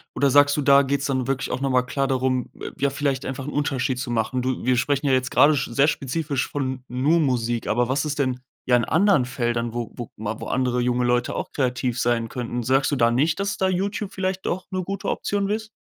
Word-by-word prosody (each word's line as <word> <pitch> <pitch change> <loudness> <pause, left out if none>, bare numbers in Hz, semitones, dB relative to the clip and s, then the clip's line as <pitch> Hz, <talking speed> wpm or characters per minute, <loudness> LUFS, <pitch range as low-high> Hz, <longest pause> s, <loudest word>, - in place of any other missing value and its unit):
Oder 140 - +3
sagst 145 +1 +5
du, - - +1
da 140 0 +6
geht's 140 +1 -1
dann 130 -2 -1
wirklich 135 -1 -1
auch - - -2
noch 135 - 0
mal 125 -1 +3
klar 135 +2 -1
darum, 130 -2 0
äh, - - -5
ja 140 0 +1
vielleicht 140 -1 -2
einfach 135 0 -5
'n - - -4
Unterschied 135 -3 -1
zu 125 -1 -4
machen? 120 +2 0
Du 130 0 -2
wir 130 - +3
sprechen 140 +3 0
ja - - +3
jetzt 130 0 +1
grade 150 +1 +5
sch 135 - -1
sehr 140 +4 +3
spezifisch 140 -1 -1
von 130 -2 -3
nur 140 +7 +2
Musik, 120 -5 0
aber 120 +2 +1
was 140 +4 0
ist 150 -1 -3
denn 130 -2 0 0.3
ja 125 - +4
in 120 - 0
anderen 175 -5 +3
Feldern, 120 -2 -2
wo 120 -1 -4
wo 120 -2 -7
mal 110 +1 -4
wo - - -6
andere 125 -1 0
junge 125 0 +1
Leute 120 0 +1
auch - - -4
kreativ 125 -2 -1
sein 120 -1 +1
könnten? 120 -1 -4
Sagst 135 +5 +2
du - - +1
da 115 -3 +3
nicht, 150 +9 +1
dass 200 0 -2
da 190 - +1
YouTube 195 +2 -2
vielleicht 190 0 -3
doch 185 +1 -2
'ne 185 0 -2
gute 195 +2 -4
Option 200 -1 -1
ist? 215 +1 -2
130 Hz, 245 wpm, -23 LUFS, 125-145 Hz, 0.3 s, da